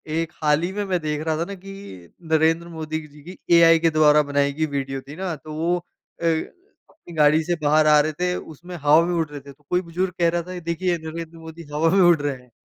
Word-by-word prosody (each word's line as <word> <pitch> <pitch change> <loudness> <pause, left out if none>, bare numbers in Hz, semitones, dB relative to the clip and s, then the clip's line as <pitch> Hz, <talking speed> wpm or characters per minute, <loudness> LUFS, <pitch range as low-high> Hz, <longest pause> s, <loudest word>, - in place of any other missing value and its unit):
एक 165 0 -1
हाल 150 0 +3
ही 175 - -2
में, 205 +1 -2
मैं 185 -2 0
देख 150 -1 -3
रहा 160 -1 0
था 165 - -1
ना 200 - -7
कि 195 +1 -11 0.6
नरेंद्र 160 +2 +2
मोदी 160 -2 -5
जी 150 0 -17
की 180 +4 -10 0.2
एआई 165 -1 +7
के 165 0 +3
द्वारा 150 -1 +5
बनाई 140 0 +1
गई 155 +2 0
वीडियो 135 -2 -4
थी 145 - -9
ना, 185 -1 -3
तो 155 +1 -10
वो 165 +3 0 0.4
अ, - - -2
अपनी 175 - -5
गाड़ी 155 +1 +4
से 175 +2 -1
बाहर 155 +1 +4
आ 150 0 +6
रहे 155 +1 -1
थे, 180 +3 -1
उसमें 175 +3 -9
हवा 150 0 +4
में 175 - -1
उड़ 165 -2 0
रहे 145 -1 -8
थे। 140 +1 -12
तो 145 +2 -32
कोई 180 0 +1
बुज़ुर्ग 180 +1 -3
कह 170 -1 +4
रहा 170 +1 -1
था, 185 - -6
"ये 180 - -6
देखिए, 170 +1 -1
नरेंद्र 165 +1 -8
मोदी 160 +1 -10
हवा 160 +2 +2
में 190 +3 +4
उड़ 175 -2 +6
रहे 145 -1 -1
हैं।" 125 -1 -24
160 Hz, 250 wpm, -22 LUFS, 150-175 Hz, 0.6 s, एआई